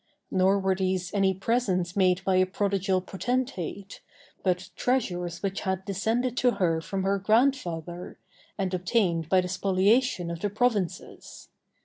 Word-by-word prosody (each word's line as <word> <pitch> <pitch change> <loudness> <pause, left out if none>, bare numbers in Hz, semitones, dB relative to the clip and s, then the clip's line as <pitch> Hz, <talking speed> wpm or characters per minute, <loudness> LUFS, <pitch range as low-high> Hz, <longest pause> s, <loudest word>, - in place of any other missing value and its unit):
Nor 190 +1 +3
were 190 -1 +1
these 185 -1 -1
any 195 -2 +3
presents 190 -4 0
made 185 -2 +2
by 190 -1 +2
a 185 0 +4
prodigal 195 -1 0
potentate, 200 - -3 0.4
but 185 0 -1
treasures 180 -9 -1
which 195 0 -2
had 190 0 -2
descended 225 +5 -1
to 245 -1 +3
her 165 -3 +1
from 190 +3 -3
her 195 +1 +1
grandfather, 185 - 0 0.4
and 190 -2 -2
obtained 180 -3 0
by 185 0 +4
the 180 - -4
spoliation 190 +1 +1
of 170 - -5
the 205 +3 -1
provinces. 210 -4 -2
190 Hz, 140 wpm, -27 LUFS, 180-205 Hz, 0.4 s, a